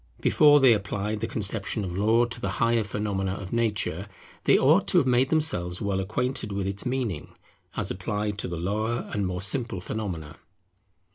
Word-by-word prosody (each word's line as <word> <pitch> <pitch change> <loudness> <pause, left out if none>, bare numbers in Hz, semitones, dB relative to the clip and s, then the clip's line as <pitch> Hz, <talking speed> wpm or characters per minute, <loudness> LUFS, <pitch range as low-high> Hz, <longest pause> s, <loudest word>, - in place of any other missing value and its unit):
Before 145 -1 +5
they 130 -4 +6
applied 105 +1 -2
the 115 - -2
conception 105 0 -2
of 90 -1 -5
Law 110 +4 +3
to 120 0 -7
the 100 - -2
higher 115 -1 +2
phenomena 100 -2 -2
of 100 0 -8
nature, 105 -5 -1 0.4
they - - +5
ought - - +4
to - - +3
have - - +4
made 130 +1 +3
themselves 90 - +1
well 100 -2 -1
acquainted 115 +3 -2
with 100 -1 -2
its 100 +4 -3
meaning, 125 - -3 0.4
as - - -1
applied 105 +2 -3
to - - -3
the 85 -2 -5
lower 110 +7 -2
and 100 -2 -1
more 90 +1 -2
simple 115 -1 0
phenomena. 90 -6 -5
105 Hz, 180 wpm, -26 LUFS, 95-115 Hz, 0.4 s, they